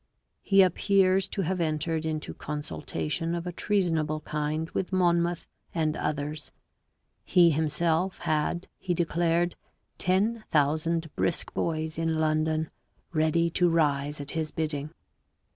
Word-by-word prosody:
He 195 -1 +5
appears 190 +1 +3
to 195 0 -2
have 180 +1 -1
entered 160 0 -1
into 155 -1 -3
consultation 145 - -3
of 170 0 -4
a 180 - -3
treasonable 165 -6 0
kind 150 +1 -2
with 190 - -2
Monmouth 175 -2 +2 0.3
and 155 -2 +1
others; 150 0 -3 0.7
he 175 -2 +5
himself 160 +4 +1
had, 155 +3 -1
he 180 -2 -1
declared, 170 +1 +1 0.4
ten 210 +5 +1
thousand 160 +2 +1
brisk 170 - 0
boys 160 -1 -2
in 165 -1 0
London 155 0 +1 0.4
ready 165 +1 +2
to 175 +1 +3
rise 145 -3 +1
at 145 0 -5
his 160 -1 -2
bidding. 150 -2 -3
160 Hz, 125 wpm, -28 LUFS, 155-175 Hz, 0.7 s, He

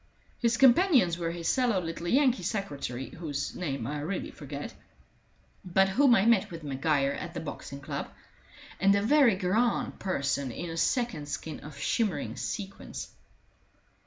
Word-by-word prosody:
His 235 -1 +2
companions 255 - +5
were 165 -1 -1
his 170 0 -4
sallow 245 -6 +2
little 170 0 -5
Yankee 255 -1 +3
secretary, 145 - -3
whose 145 -4 -4
name 140 -9 -3
I 145 +4 -3
really 175 +6 -3
forget, 145 0 -7 0.9
but 190 +1 +3
whom 245 +4 +5
I 195 - +3
met 230 -4 +4
with 165 -2 -8
Maguire 140 0 +1
at 170 +4 -6
the - - -2
Boxing 140 -2 -7
Club, - - -4 0.7
and 195 +1 +5
a 200 - +1
very 260 -2 +5
grand 205 +6 0
person 140 -7 -1
in 170 +8 -5
a - - -5
second 230 - 0
skin 155 +2 -5
of 150 -1 -11
shimmering 160 - -1
sequins. 200 -2 -5
175 Hz, 150 wpm, -29 LUFS, 145-225 Hz, 0.9 s, companions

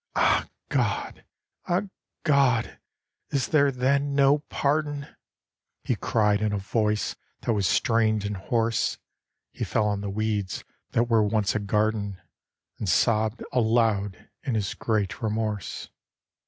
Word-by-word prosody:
'Ah, - - +3 0.2
God! - - -1 0.4
Ah, 180 +2 +2 0.4
God! 135 -7 +2 0.5
is 135 -3 0
there 145 -3 +4
then 140 +2 +1
no 140 +1 +5
pardon?' 145 -1 0 0.8
He - - 0
cried 105 -2 +1
in 105 -1 +1
a 105 - 0
voice 105 +1 0 0.3
that 115 - 0
was 100 -3 +1
strained 110 -2 +2
and 105 0 -2
hoarse; 115 +4 0 0.5
He - - -5
fell 110 - +1
on 100 -1 -1
the 100 - -3
weeds 105 -2 -2 0.3
that 115 - +4
were 115 -2 +4
once 105 -1 +1
a 105 - 0
garden, 105 -1 0 0.6
And 105 - -2
sobbed 110 +2 +2
aloud 110 -5 +1
in 130 -5 -2
his 100 -3 -1
great 105 -2 -1
remorse. 110 -2 -2
110 Hz, 130 wpm, -26 LUFS, 105-125 Hz, 0.8 s, no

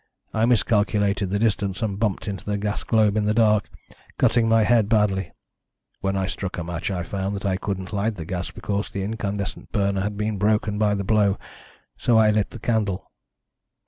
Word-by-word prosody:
I 110 +1 +2
miscalculated 105 -4 +2
the 100 - 0
distance, 105 -2 0
and 100 -2 -2
bumped 105 -3 -1
into 100 -2 -4
the 105 0 -1
gas 105 +1 -2
globe 110 -2 +3
in 105 -1 +1
the 105 +1 +1
dark, 105 -3 +3 0.5
cutting 115 -2 +3
my 115 -1 +5
head 110 -2 +3
badly. 100 -4 +2 0.7
When 95 0 -1
I 95 - 0
struck 95 -1 -4
a 90 - -2
match 85 +2 -3
I 90 -3 -2
found 95 +3 -3
that 100 - -5
I 95 -1 +1
couldn't 95 0 -4
light 105 +2 0
the 85 -4 -6
gas 90 +1 -3
because 100 0 -3
the 100 - -4
incandescent 100 -1 -4
burner 100 -2 +1
had 105 +1 -3
been 105 -1 -2
broken 105 0 +1
by 105 -1 +3
the 100 - -2
blow, 105 -1 +2 0.6
so 120 -2 +3
I 110 -1 +5
lit 105 -1 +1
the - - -9
candle. 110 -5 -1
105 Hz, 195 wpm, -24 LUFS, 95-110 Hz, 0.7 s, my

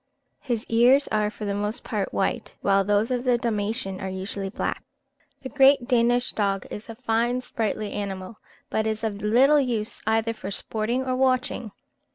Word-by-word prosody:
His 240 -5 -3
ears 245 +5 +4
are 210 -1 +1
for 210 0 -7
the 200 - -1
most 210 +2 -2
part - - -2
white, - - -2
while 195 0 +3
those 205 +4 +1
of 250 -1 0
the 250 -2 +3
Dalmatian 210 -4 -2
are 190 - -3
usually 195 +1 -4
black. 195 - -3 0.6
The 260 - -5
great 270 -2 +5
Danish 245 0 +2
dog 195 -2 -1
is 210 +2 -7
a 225 - -6
fine 240 +1 0
sprightly 215 -4 -3
animal, 195 0 -5 0.3
but 220 0 0
is 220 +1 -2
of 210 -2 -2
little 260 +8 +5
use 235 -5 -1
either 225 +1 +1
for 195 - -7
sporting 225 +5 -2
or 255 -1 0
watching. 255 -3 0
225 Hz, 175 wpm, -25 LUFS, 205-245 Hz, 0.6 s, great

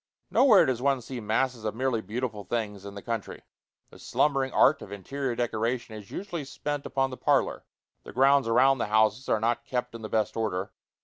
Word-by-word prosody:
Nowhere 225 -8 +6
does 125 -2 -1
one 135 0 +2
see 125 +1 -7
masses 115 +2 -1
of 110 0 -2
merely 125 -2 0
beautiful 110 0 -4
things 105 -2 -3
in 100 0 -8
the 100 - -8
country. 115 -3 -5 0.5
The - - -15
slumbering 135 -3 +1
art 140 +3 +4
of 100 - -10
interior 125 +6 -4
decoration 115 0 -2
is 105 -2 -10
usually 175 -6 -5
spent 145 +1 -4
upon 135 -1 0
the 130 - -7
parlor. - - +1 0.4
The - - -11
grounds 135 0 +4
around 130 +3 +4
the - - -1
houses 110 +5 +2
are 110 - +3
not 120 +2 0
kept 125 0 -3
in 115 - -8
the 110 - -6
best 110 -1 0
order. 100 -3 -2
120 Hz, 195 wpm, -27 LUFS, 110-135 Hz, 0.5 s, Nowhere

